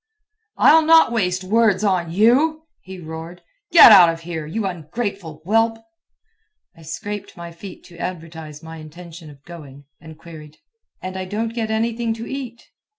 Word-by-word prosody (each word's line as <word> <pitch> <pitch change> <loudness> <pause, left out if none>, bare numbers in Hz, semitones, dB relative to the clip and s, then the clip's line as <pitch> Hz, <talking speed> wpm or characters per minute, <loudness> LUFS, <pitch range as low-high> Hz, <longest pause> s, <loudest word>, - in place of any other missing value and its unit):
"I'll 320 - +6
not 325 -3 +5
waste 185 -5 -1
words 210 0 +1
on 180 -5 0
you," 265 - +2 0.2
he 190 0 -11
roared. 165 +2 -9 0.3
"Get 330 -8 +9
out 185 -5 +8
of 165 0 -5
here, 165 -2 -6
you 210 +6 -4
ungrateful 180 -1 -6
whelp!" 225 +3 +1 1.0
I 165 - -18
scraped 200 +6 -7
my 170 0 -9
feet 180 +3 -12
to 175 - -16
advertise 160 -4 -8
my 160 0 -10
intention 165 +1 -12
of 140 -1 -17
going, 145 -5 -13
and 160 -1 -13
queried: 155 -2 -13 0.5
"And 185 0 -6
I 190 0 -5
don't 220 +4 -4
get 225 -2 -3
anything 225 +1 -2
to 230 0 -8
eat?" 250 -3 -7
185 Hz, 155 wpm, -20 LUFS, 165-225 Hz, 1.0 s, Get